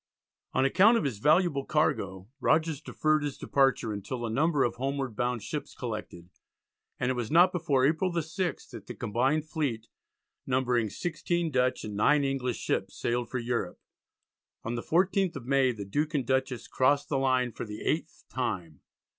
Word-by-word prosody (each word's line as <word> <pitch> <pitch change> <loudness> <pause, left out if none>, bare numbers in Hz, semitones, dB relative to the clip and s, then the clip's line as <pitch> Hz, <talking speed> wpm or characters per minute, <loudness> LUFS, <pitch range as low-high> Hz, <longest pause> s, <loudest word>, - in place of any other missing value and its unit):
On 130 - +3
account 200 - +5
of - - 0
his 125 -8 -2
valuable 155 - +3
cargo 100 - 0
Rogers 155 +1 +1
deferred 155 0 +1
his 145 -2 -3
departure 135 -5 +1
until 120 +4 -4
a 115 - -3
number 150 +3 +2
of 120 - -1
homeward 135 -2 -2
bound 120 -1 -1
ships 145 +3 -5
collected, 105 -7 -6 0.7
and 130 - +1
it - - +1
was 120 -3 -3
not 175 +4 +6
before 155 -7 +1
April 160 +5 +1
the 170 -1 0
6th 175 +3 -4
that - - -10
the - - -7
combined 130 +7 0
fleet, 135 -9 -3 0.6
numbering 125 -4 +1
16 170 - -2
Dutch 125 -1 +1
and 105 -1 -6
9 145 +8 +4
English 135 -3 -1
ships, 95 0 -2
sailed 120 -1 -1
for 130 - -3
Europe. 120 0 -2 0.8
On 115 - -3
the 120 - -2
14th 185 +3 +1
of 120 - -7
May 135 -1 +3
the 105 -4 -6
Duke 150 +10 -1
and 135 -4 0
Dutchess 130 -2 -1
crossed 145 +2 +2
the 140 - +1
line 130 -2 +2
for - - -6
the 105 -1 -8
eighth 160 0 -2
time. 90 - -4
135 Hz, 175 wpm, -29 LUFS, 120-155 Hz, 0.8 s, not